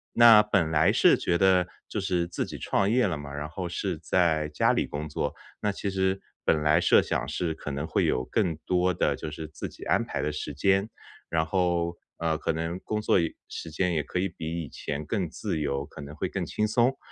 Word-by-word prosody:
那 115 Hz, -3 st, +9 dB
本 95 Hz, -6 st, +1 dB
来 80 Hz, +6 st, +4 dB
是 170 Hz, +9 st, +5 dB
觉 85 Hz, -1 st, +1 dB
得 95 Hz, -1 st, +4 dB, 0.2 s
就 105 Hz, -, -3 dB
是 90 Hz, -3 st, 0 dB
自 85 Hz, -, -3 dB
己 -, -, -7 dB
创 100 Hz, +1 st, +1 dB
业 125 Hz, -3 st, +3 dB
了 80 Hz, -4 st, -2 dB
嘛， 70 Hz, -1 st, -8 dB
然 75 Hz, +1 st, -4 dB
后 90 Hz, +2 st, -5 dB
是 90 Hz, -1 st, -2 dB
在 80 Hz, -2 st, +1 dB
家 75 Hz, -, +2 dB
里 -, -, +1 dB
工 75 Hz, +1 st, -5 dB
作， 75 Hz, -, -2 dB, 0.3 s
那 105 Hz, -, +1 dB
其 100 Hz, 0 st, -3 dB
实 95 Hz, 0 st, 0 dB, 0.2 s
本 75 Hz, -2 st, +2 dB
来 75 Hz, +3 st, +4 dB
设 -, -, +6 dB
想 65 Hz, -, -2 dB
是 80 Hz, +1 st, -1 dB
可 75 Hz, -2 st, -6 dB
能 70 Hz, +3 st, -3 dB
会 -, -, +1 dB
有 65 Hz, 0 st, +1 dB
更 90 Hz, -8 st, 0 dB
多 90 Hz, 0 st, +2 dB
的 -, -, +1 dB
就 75 Hz, -, -6 dB
是 80 Hz, +1 st, -6 dB
自 75 Hz, -, -7 dB
己 -, -, -12 dB
安 -, -, +2 dB
排 -, -, -3 dB
的 75 Hz, -, -1 dB
时 75 Hz, -, -4 dB
间。 95 Hz, +7 st, +2 dB, 0.4 s
然 80 Hz, -1 st, +1 dB
后， 85 Hz, -1 st, 0 dB, 0.2 s
呃， 80 Hz, -1 st, 0 dB
可 -, -, -1 dB
能 80 Hz, +2 st, -3 dB
工 105 Hz, 0 st, -2 dB
作 105 Hz, -, +3 dB
也 80 Hz, -, -2 dB
时 80 Hz, -, -7 dB
间 90 Hz, +2 st, 0 dB
也 75 Hz, -2 st, 0 dB
可 90 Hz, -, -3 dB
以 95 Hz, -, +1 dB
比 85 Hz, -1 st, -5 dB
以 -, -, -10 dB
前 75 Hz, +3 st, -5 dB
更 95 Hz, -5 st, -1 dB
自 80 Hz, -, -3 dB
由， 70 Hz, -1 st, -1 dB
可 80 Hz, -1 st, -11 dB
能 70 Hz, +1 st, -8 dB
会 -, -, -2 dB
更 -, -, -3 dB
轻 105 Hz, 0 st, -1 dB
松。 120 Hz, +4 st, +2 dB
85 Hz, 250 characters per minute, -27 LUFS, 75-95 Hz, 0.4 s, 那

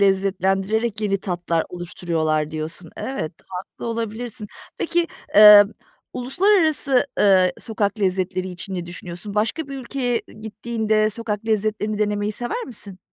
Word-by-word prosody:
lezzetlendirerek 195 Hz, +3 st, +1 dB
yeni 200 Hz, -2 st, 0 dB
tatlar 175 Hz, -3 st, -1 dB
oluşturuyorlar 165 Hz, -3 st, -2 dB
diyorsun. 160 Hz, +2 st, -6 dB
Evet, 260 Hz, -, -4 dB, 0.2 s
haklı 185 Hz, +4 st, -7 dB
olabilirsin. 225 Hz, -1 st, -4 dB, 0.3 s
Peki, 340 Hz, 0 st, +1 dB, 0.3 s
emm, 210 Hz, 0 st, +10 dB, 0.4 s
uluslararası, 300 Hz, -2 st, +2 dB, 0.2 s
ııı, 185 Hz, -2 st, +5 dB
sokak 215 Hz, -1 st, -2 dB
lezzetleri 185 Hz, -1 st, 0 dB
için 185 Hz, +2 st, -6 dB
ne 175 Hz, -1 st, -4 dB
düşünüyorsun? 175 Hz, +3 st, -7 dB
Başka 230 Hz, +9 st, -1 dB
bir 275 Hz, -1 st, -5 dB
ülkeye 245 Hz, -2 st, -2 dB, 0.2 s
gittiğinde 215 Hz, 0 st, 0 dB
sokak 220 Hz, -1 st, -4 dB
lezzetlerini 215 Hz, -1 st, 0 dB
denemeyi 210 Hz, 0 st, 0 dB
sever 245 Hz, -, -3 dB
misin? 205 Hz, -6 st, -11 dB
210 Hz, 120 wpm, -22 LUFS, 185-230 Hz, 0.4 s, emm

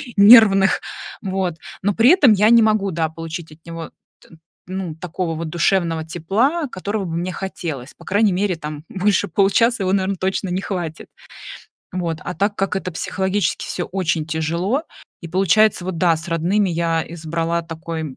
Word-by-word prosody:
нервных. 200 Hz, -2 st, +7 dB, 0.4 s
Вот. 190 Hz, -3 st, -2 dB, 0.3 s
Но 205 Hz, +2 st, +1 dB
при 230 Hz, +7 st, +5 dB
этом 320 Hz, -10 st, +6 dB
я 210 Hz, +1 st, +4 dB
не 235 Hz, 0 st, +7 dB
могу, 215 Hz, -3 st, +2 dB
да, 160 Hz, -1 st, -1 dB
получить 165 Hz, 0 st, -7 dB
от 155 Hz, +1 st, -18 dB
него 165 Hz, -1 st, -7 dB, 0.3 s
т -, -, -21 dB, 0.4 s
ну, 185 Hz, -3 st, -4 dB
такого 170 Hz, 0 st, -4 dB
вот 160 Hz, 0 st, -4 dB
душевного 170 Hz, -1 st, 0 dB
тепла, 220 Hz, -, 0 dB
которого 205 Hz, -2 st, -4 dB
бы 165 Hz, -2 st, -4 dB
мне 180 Hz, +2 st, -2 dB
хотелось. 160 Hz, -8 st, -6 dB
По -, -, -15 dB
крайней 205 Hz, +1 st, +2 dB
мере, 190 Hz, 0 st, 0 dB
там 150 Hz, -2 st, -7 dB
больше 195 Hz, 0 st, +1 dB
получаса 205 Hz, +6 st, +2 dB
его, 185 Hz, 0 st, 0 dB
наверное, 195 Hz, 0 st, 0 dB
точно 190 Hz, +1 st, -2 dB
не 180 Hz, +2 st, -1 dB
хватит. 175 Hz, -6 st, -5 dB, 0.9 s
Вот, 170 Hz, -3 st, -2 dB
а 180 Hz, -, -4 dB
так 200 Hz, +2 st, 0 dB
как 195 Hz, 0 st, -1 dB
это 185 Hz, -1 st, -4 dB
психологически 190 Hz, +2 st, -1 dB
всё 175 Hz, -, -3 dB
очень 170 Hz, -4 st, -1 dB
тяжело, 170 Hz, -, -1 dB, 0.4 s
и 170 Hz, -, -8 dB
получается 195 Hz, +3 st, +3 dB
вот, 185 Hz, -2 st, -4 dB
да, 170 Hz, -1 st, +3 dB
с 160 Hz, +3 st, -8 dB
родными 180 Hz, +5 st, +1 dB
я 165 Hz, -1 st, 0 dB
избрала 165 Hz, +1 st, -2 dB
такой, 165 Hz, 0 st, -6 dB
м, 140 Hz, -4 st, -7 dB
180 Hz, 170 wpm, -20 LUFS, 165-200 Hz, 0.9 s, нервных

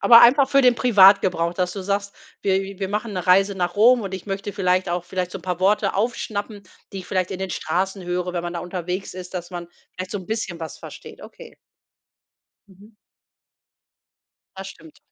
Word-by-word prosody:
Aber 235 Hz, -1 st, +8 dB
einfach 265 Hz, +3 st, +6 dB
für 275 Hz, 0 st, +4 dB
den 250 Hz, -1 st, +5 dB
Privatgebrauch, 190 Hz, -7 st, +4 dB
dass 180 Hz, 0 st, -1 dB
du 195 Hz, -, -6 dB
sagst: 200 Hz, +1 st, -2 dB, 0.3 s
„Wir 195 Hz, -1 st, +1 dB, 0.2 s
wir 195 Hz, -, -3 dB
machen 210 Hz, +2 st, -3 dB
'ne 185 Hz, -2 st, -4 dB
Reise 195 Hz, +2 st, +4 dB
nach 175 Hz, -2 st, -2 dB
Rom 240 Hz, +4 st, +6 dB
und 195 Hz, -1 st, -5 dB
ich 190 Hz, -, -8 dB
möchte 200 Hz, +1 st, -4 dB
vielleicht 185 Hz, -2 st, +1 dB
auch 175 Hz, 0 st, -2 dB
vielleicht 180 Hz, -1 st, -3 dB
so -, -, -5 dB
'n 175 Hz, -, -18 dB
paar 180 Hz, -2 st, -3 dB
Worte 200 Hz, +1 st, +2 dB
aufschnappen, 210 Hz, -1 st, -3 dB, 0.3 s
die 195 Hz, -, -5 dB
ich 185 Hz, -, -9 dB
vielleicht 185 Hz, -2 st, -1 dB
in 190 Hz, -, -5 dB
den 190 Hz, -1 st, -3 dB
Straßen 190 Hz, +4 st, -2 dB
höre, 180 Hz, 0 st, -2 dB
wenn 175 Hz, -1 st, -3 dB
man 175 Hz, -, -4 dB
da 170 Hz, -, -3 dB
unterwegs 180 Hz, +2 st, -5 dB
ist, 185 Hz, 0 st, -9 dB
dass 175 Hz, 0 st, -5 dB
man 175 Hz, -1 st, -7 dB, 0.3 s
vielleicht 185 Hz, 0 st, -6 dB
so 205 Hz, -, -2 dB
'n 185 Hz, -, -11 dB
bisschen 215 Hz, -6 st, -4 dB
was 160 Hz, -, -7 dB
versteht.“ -, -, -11 dB
Okay. 480 Hz, -1 st, -13 dB, 1.1 s
Mhm. 200 Hz, +3 st, -18 dB, 1.6 s
Das 195 Hz, 0 st, -7 dB
stimmt. 160 Hz, -4 st, -14 dB
190 Hz, 200 wpm, -22 LUFS, 180-205 Hz, 1.6 s, Aber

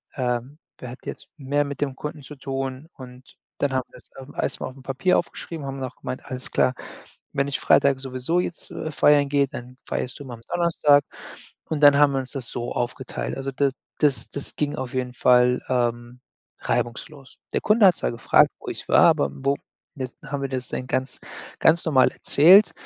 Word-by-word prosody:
Ähm, 125 Hz, +2 st, -2 dB, 0.2 s
wer 125 Hz, -, -7 dB
hat 125 Hz, -, -13 dB
jetzt -, -, -7 dB
mehr 145 Hz, +1 st, 0 dB
mit 140 Hz, 0 st, -7 dB
dem 135 Hz, -3 st, -1 dB
Kunden 150 Hz, +2 st, -6 dB
zu 150 Hz, -, -10 dB
tun?“ 135 Hz, +1 st, -4 dB
Und 125 Hz, -2 st, -12 dB, 0.4 s
dann 140 Hz, -2 st, 0 dB
haben 130 Hz, -1 st, 0 dB
wir's, -, -, -17 dB
ähm, 135 Hz, +2 st, -11 dB
erstmal -, -, -2 dB
auf'm 130 Hz, 0 st, -15 dB
Papier 135 Hz, +8 st, +1 dB
aufgeschrieben, 165 Hz, -3 st, -6 dB
haben 135 Hz, 0 st, -5 dB
auch 130 Hz, -, -6 dB
gemeint: 130 Hz, -, -6 dB
„Alles 130 Hz, -1 st, -7 dB
klar, 130 Hz, -, +2 dB, 0.6 s
wenn 140 Hz, 0 st, 0 dB
ich 140 Hz, -, -2 dB
Freitag 140 Hz, -1 st, +4 dB
sowieso 130 Hz, +6 st, -1 dB
jetzt, 175 Hz, -2 st, -4 dB
äh, 155 Hz, -, -5 dB
feiern 145 Hz, 0 st, +4 dB
gehe, 140 Hz, -1 st, +2 dB
dann 125 Hz, 0 st, -9 dB
feierst 130 Hz, -, -3 dB
du 140 Hz, -2 st, -9 dB
am 115 Hz, -1 st, -9 dB
Donnerstag.“ 165 Hz, -5 st, +3 dB, 0.7 s
Und 155 Hz, -2 st, -2 dB
dann 145 Hz, -1 st, +8 dB
haben 145 Hz, -1 st, +5 dB
wir 135 Hz, -, +1 dB
uns 130 Hz, -1 st, -5 dB
das 130 Hz, -4 st, -5 dB
so 120 Hz, 0 st, -4 dB
aufgeteilt. 125 Hz, +1 st, -3 dB
Also, 135 Hz, 0 st, -3 dB
das 135 Hz, 0 st, +1 dB, 0.3 s
das 145 Hz, -3 st, +1 dB
das 140 Hz, -, -7 dB
ging 150 Hz, -1 st, -1 dB
auf 130 Hz, -2 st, -5 dB
jeden 125 Hz, -1 st, -2 dB
Fall, 125 Hz, 0 st, +4 dB
ähm, 120 Hz, 0 st, -1 dB, 0.4 s
reibungslos. 125 Hz, +3 st, -4 dB
Der -, -, +1 dB
Kunde 210 Hz, -2 st, +5 dB
hat 180 Hz, -, +5 dB
zwar -, -, -1 dB
gefragt, 115 Hz, -, +4 dB
wo -, -, -14 dB
ich -, -, -7 dB
war, -, -, +7 dB
aber 70 Hz, -, +2 dB
wo 140 Hz, -, -1 dB, 0.4 s
jetzt 130 Hz, -3 st, -6 dB
haben 140 Hz, 0 st, -4 dB
wir 135 Hz, -, -2 dB
das 130 Hz, -1 st, -3 dB
dann 130 Hz, -, -4 dB
ganz, 130 Hz, 0 st, -2 dB, 0.4 s
ganz 165 Hz, +2 st, +4 dB
normal 130 Hz, -5 st, +4 dB
erzählt, 185 Hz, +8 st, +6 dB
135 Hz, 195 wpm, -24 LUFS, 125-145 Hz, 0.7 s, dann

